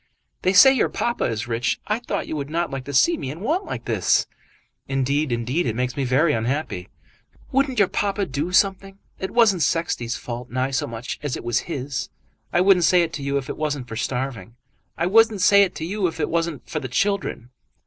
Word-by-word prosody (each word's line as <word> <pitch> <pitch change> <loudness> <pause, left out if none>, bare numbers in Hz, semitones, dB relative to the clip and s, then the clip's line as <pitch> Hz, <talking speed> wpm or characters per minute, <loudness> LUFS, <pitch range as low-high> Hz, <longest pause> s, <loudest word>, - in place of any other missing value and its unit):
"They 185 - +2
say 265 +8 +8
your 260 - +1
papa 240 0 -1
is 115 +1 -2
rich. 115 +1 -1
I 215 +2 -1
thought 240 - -3
you - - -4
would 140 -1 -4
not 170 +2 -1
like 135 -1 -5
to 140 - -6
see 335 - +4
me 130 - -5
in 155 +6 -7
want 325 - 0
like - - -6
this." - - +2 0.6
"Indeed, 135 +2 0
indeed, 125 +7 -1
it 115 - -1
makes 125 +1 -2
me 140 - -1
very 145 +6 +3
unhappy." 115 - -2 0.6
"Wouldn't 270 -1 +1
your 200 -3 +5
papa 200 +1 -1
do 145 +4 -3
something? 195 +1 +1 0.2
It 190 - -3
wasn't 215 -7 +3
Sexty's 155 -8 0
fault 120 0 -6
nigh 130 +2 -1
so 130 - -1
much 115 +1 -6
as 145 -3 -3
it - - -9
was 120 +6 -1
his. 135 -2 -3 0.4
I 175 - +3
wouldn't 185 -2 +5
say 180 -1 +5
it 165 -1 -4
to 150 - -5
you 140 0 -1
if 135 -1 -4
it - - -5
wasn't 145 -5 -2
for 115 - -7
starving. 125 -1 -4 0.4
I 170 - 0
wouldn't 220 +1 +4
say 200 +1 +6
it 195 -3 +1
to 160 - -4
you 195 +2 0
if 165 - -6
it 150 - 0
wasn't 165 -5 -2
for 155 - -3
the 130 - -5
children. 195 - -1
155 Hz, 220 wpm, -23 LUFS, 130-195 Hz, 0.6 s, say